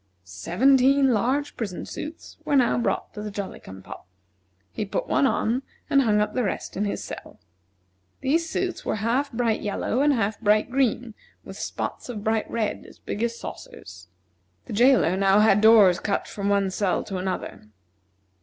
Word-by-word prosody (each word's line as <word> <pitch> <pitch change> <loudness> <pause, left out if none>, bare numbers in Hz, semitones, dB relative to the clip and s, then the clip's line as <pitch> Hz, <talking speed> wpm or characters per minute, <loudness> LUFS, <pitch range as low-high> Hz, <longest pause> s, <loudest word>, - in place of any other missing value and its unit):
Seventeen 260 - +3
large 265 +7 0
prison 200 -7 -5
suits 310 +2 -8
were 285 - 0
now 250 -3 +3
brought 235 - -2
to 210 - -7
the 210 - -5
Jolly 200 -1 -6
cum 95 0 -12
pop. - - -11 0.6
He - - -3
put 195 - -3
one 275 - +3
on, 245 0 0 0.3
and 275 - +5
hung 215 -5 +2
up 210 0 0
the 250 - 0
rest 200 - -4
in 205 - -1
his 200 - -3
cell. - - -9 0.8
These 320 +5 +1
suits 365 +1 -3
were - - -1
half 235 +7 0
bright 230 -2 0
yellow 215 +4 -1
and 295 +1 +4
half 215 -4 -1
bright 215 +1 +2
green, 245 -3 0 0.3
with - - -10
spots - - -5
of 215 -4 -6
bright 220 0 0
red, 220 -3 -2
as - - -16
big 205 - -6
as 235 0 -1
saucers. 95 -2 -10 0.6
The - - -7
jailer 240 -5 +4
now 195 +1 +4
had 210 -1 +4
doors 215 -5 +6
cut 200 - -2
from 200 -1 -3
one 200 -1 +1
cell 190 -1 0
to 195 - -5
another. 185 - -5
220 Hz, 175 wpm, -24 LUFS, 200-255 Hz, 0.8 s, doors